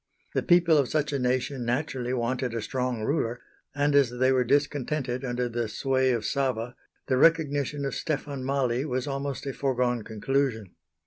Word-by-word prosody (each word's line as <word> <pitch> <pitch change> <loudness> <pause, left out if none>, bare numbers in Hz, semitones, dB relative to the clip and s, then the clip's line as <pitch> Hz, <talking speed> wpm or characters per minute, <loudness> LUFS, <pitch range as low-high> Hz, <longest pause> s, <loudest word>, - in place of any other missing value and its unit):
The - - +1
people 170 -3 +5
of 135 - +1
such 150 -1 0
a 140 - 0
nation 125 +1 0
naturally 125 0 -2
wanted 125 0 -1
a 115 - -1
strong 125 -1 -2
ruler, 120 -2 -1 0.4
and 145 0 +2
as 140 -3 +5
they 125 +2 +2
were 130 -1 +3
discontented 140 -1 0
under 125 -1 -1
the 120 -1 -2
sway 130 +3 +1
of 115 -4 0
Sava 125 -3 -1 0.3
the 130 - +1
recognition 145 -2 +2
of 135 - -2
Stefan 145 -3 -3
Mali 130 -2 0
was 130 -3 -2
almost 140 -1 -3
a 135 - -3
foregone 125 -3 0
conclusion. 110 -2 -1
130 Hz, 170 wpm, -27 LUFS, 120-140 Hz, 0.4 s, people